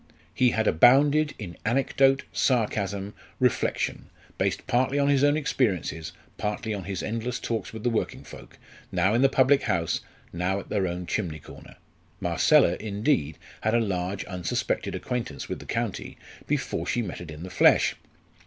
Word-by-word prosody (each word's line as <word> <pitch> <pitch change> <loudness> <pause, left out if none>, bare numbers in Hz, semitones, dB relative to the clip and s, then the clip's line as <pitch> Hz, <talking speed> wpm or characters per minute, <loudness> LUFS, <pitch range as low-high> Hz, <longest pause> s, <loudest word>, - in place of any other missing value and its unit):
He 125 - +4
had 110 -1 0
abounded 145 - +5
in 90 -6 -8
anecdote, 135 +3 +2
sarcasm, 100 -5 0 0.3
reflection, - - 0 0.3
based - - 0
partly 130 +3 +1
on 140 0 +3
his 140 -1 +3
own 145 +1 +4
experiences, 90 - -1 0.3
partly 105 +1 -2
on 100 -3 -5
his 95 -2 -4
endless 115 +2 -3
talks 115 -1 -3
with 110 -1 -8
the 120 - +2
working 115 - -2
folk, - - -13 0.3
now 95 +2 +2
in 120 - +3
the 135 - +5
public 135 +1 +4
house, 85 -2 0 0.3
now 90 +3 -1
at - - -11
their 100 -3 0
own 90 +1 -4
chimney 85 -5 -2
corner. 75 - -13 0.4
Marcella, 85 - +4
indeed, 100 - 0 0.2
had 110 +1 +1
a - - +4
large 95 -3 -2
unsuspected 90 -3 -2
acquaintance 125 -2 -4
with - - -4
the - - -12
county - - -3 0.3
before - - -2
she 120 - 0
met 90 -4 -6
it 85 - -9
in 75 +2 -8
the 90 - -8
flesh. - - +4
110 Hz, 160 wpm, -26 LUFS, 90-125 Hz, 0.4 s, abounded